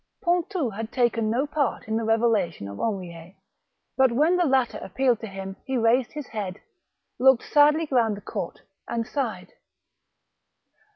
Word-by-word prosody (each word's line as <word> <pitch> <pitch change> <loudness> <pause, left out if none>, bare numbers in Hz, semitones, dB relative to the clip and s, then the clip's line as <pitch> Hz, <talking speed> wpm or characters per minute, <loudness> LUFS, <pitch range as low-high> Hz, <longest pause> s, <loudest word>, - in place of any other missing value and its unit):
Pontou 345 - 0
had 220 +3 -6
taken 235 -3 +1
no 245 +6 +1
part 285 -5 -2
in 220 - -1
the 225 - 0
revelation 220 - +1
of 100 0 -8
Henriet; 180 -4 -4 0.6
but 265 -2 +4
when 305 +9 +3
the 355 -1 +2
latter 260 -3 +1
appealed 245 +3 0
to 225 - -6
him 195 -1 -7
he 265 -1 -2
raised 235 +2 +2
his 295 -2 -6
head, 200 -5 -5 0.6
looked 265 -1 +5
sadly 300 +2 +4
round 225 -5 +2
the - - -10
court, 170 - -5 0.3
and 230 -1 -2
sighed. 275 +3 -4
235 Hz, 155 wpm, -25 LUFS, 210-270 Hz, 0.6 s, looked